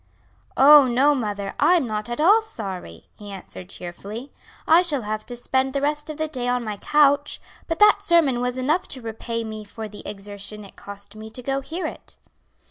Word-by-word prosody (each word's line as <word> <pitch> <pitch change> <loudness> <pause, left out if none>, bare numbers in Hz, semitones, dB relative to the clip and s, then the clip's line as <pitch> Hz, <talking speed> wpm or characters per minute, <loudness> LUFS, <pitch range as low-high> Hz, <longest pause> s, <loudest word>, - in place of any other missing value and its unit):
"Oh, 285 0 +8
no, 265 +4 +4
mother, 205 -6 -3
I'm 345 -5 +4
not 215 -1 -3
at 240 - -4
all 405 +8 +6
sorry," 190 - -7
he 205 -1 -9
answered 185 -1 -9
cheerfully; 200 +9 -7 0.3
"I 330 +2 +7
shall 300 -8 0
have 215 +1 -4
to 245 - -2
spend 260 +2 0
the 280 - -1
rest 295 +1 -1
of 305 - -6
the 315 0 -1
day 255 -5 -4
on 245 0 0
my 210 -2 -4
couch, 285 +3 +2 0.3
but 330 - -2
that 420 -1 +6
sermon 330 -10 +3
was 250 0 -2
enough 300 +8 0
to 260 - -5
repay 230 +1 -4
me 215 -1 -6
for 215 +1 -8
the 210 0 -11
exertion 205 +1 -7
it 195 - -15
cost 200 +1 -8
me 220 0 -9
to 250 +3 -8
go 270 +1 -1
to - - -15
hear 345 +3 -4
it." - - -8
245 Hz, 205 wpm, -23 LUFS, 210-295 Hz, 0.3 s, Oh